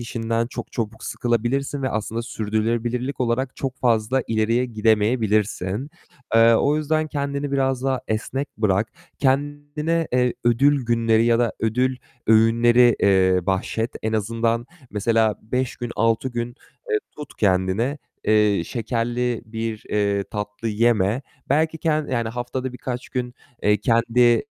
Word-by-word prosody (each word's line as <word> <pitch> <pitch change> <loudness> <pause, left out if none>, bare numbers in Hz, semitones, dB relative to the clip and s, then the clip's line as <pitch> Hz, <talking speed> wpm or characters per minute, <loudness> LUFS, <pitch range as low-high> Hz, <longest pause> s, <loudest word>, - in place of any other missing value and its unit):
işinden 115 0 -2
çok - - -7
çabuk 110 -1 -4
sıkılabilirsin 125 +4 -1
ve 130 - +1
aslında 110 +2 -3
sürdürülebilirlik 115 +4 -2
olarak 125 +1 -1
çok 135 -1 -3
fazla 120 +1 +2
ileriye 115 +3 +1
gidemeyebilirsin. 110 0 +1 0.4
Eee, 115 0 +7
o 145 +6 +2
yüzden 155 +1 0
kendini 140 -1 -3
biraz 135 -2 +1
daha 135 -2 0
esnek 130 +6 -2
bırak. 105 0 +1 0.3
Kendine, 145 +4 0
eee, 125 -1 +2
ödül 135 +3 +3
günleri 115 -1 +3
ya 120 0 +3
da 120 -2 +1
ödül 125 +4 +1 0.3
öğünleri, 115 +2 +5
eee, 95 -2 +4
bahşet. 95 -1 +1 0.4
En 110 - -1
azından 115 +2 0 0.2
mesela 110 +1 +2
5 125 +3 -2
gün, 120 -1 -5
6 115 +3 +1
gün, 120 -1 -3 0.4
eee, 430 - +3 0.2
tut 150 - -9
kendini, 100 +8 +1 0.3
eee, 105 -3 +3
şekerli 120 0 -2
bir, 110 0 -5
eee, 100 -1 0
tatlı 105 +1 -4
yeme. 110 +1 +2 0.3
Belki 160 +3 +1
kendi 155 -3 0
yani, 115 -3 0
haftada 125 +2 -4
birkaç 125 0 -5
gün, 125 -1 -3 0.3
eee, 105 0 +4
kendi, 115 +3 +1
eee, 120 -1 +5
115 Hz, 135 wpm, -22 LUFS, 110-130 Hz, 0.4 s, Eee